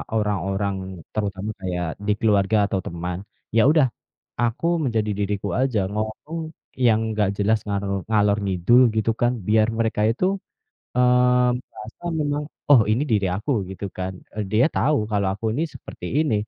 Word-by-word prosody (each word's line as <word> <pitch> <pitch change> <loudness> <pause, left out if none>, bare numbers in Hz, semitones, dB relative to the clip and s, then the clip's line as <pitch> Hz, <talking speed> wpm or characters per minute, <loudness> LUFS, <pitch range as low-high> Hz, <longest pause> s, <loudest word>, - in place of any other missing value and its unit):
orang-orang 100 -2 0 0.4
terutama 100 -1 -2
kayak 90 -2 -2 0.2
di 105 - +4
keluarga 105 -2 +3
atau 95 - 0
teman, 85 +1 -4 0.4
ya - - +7
udah, 155 -4 +4 0.6
aku 120 +6 -1 0.2
menjadi 110 -5 0
diriku 100 0 -1
aja. 130 -5 +1
Ngomong 110 +9 -4 0.5
yang 110 -2 +5 0.2
nggak 105 -2 +2
jelas 105 +2 +3
ngarol 100 -1 -1
ngalor-ngidul 105 +1 +3
gitu 110 +1 +2
kan, 120 +1 +3
biar 110 0 +4
mereka 110 -2 0
itu, 125 +10 -1 0.7
eee 125 0 +4
merasa 115 +3 -12 0.2
memang, 145 0 -1 0.3
oh 130 -6 +8
ini 125 +6 +1
diri 100 -3 +2
aku, 105 +9 -4 0.2
gitu 95 +1 -7
kan, 95 0 -3 0.2
eee, 105 0 -2
dia 115 +5 +5
tahu 150 +1 +2
kalau 100 -2 +1
aku 100 - -13
ini 145 - -1
seperti - - -9
ini, 155 -7 +1
110 Hz, 150 wpm, -23 LUFS, 100-120 Hz, 0.7 s, oh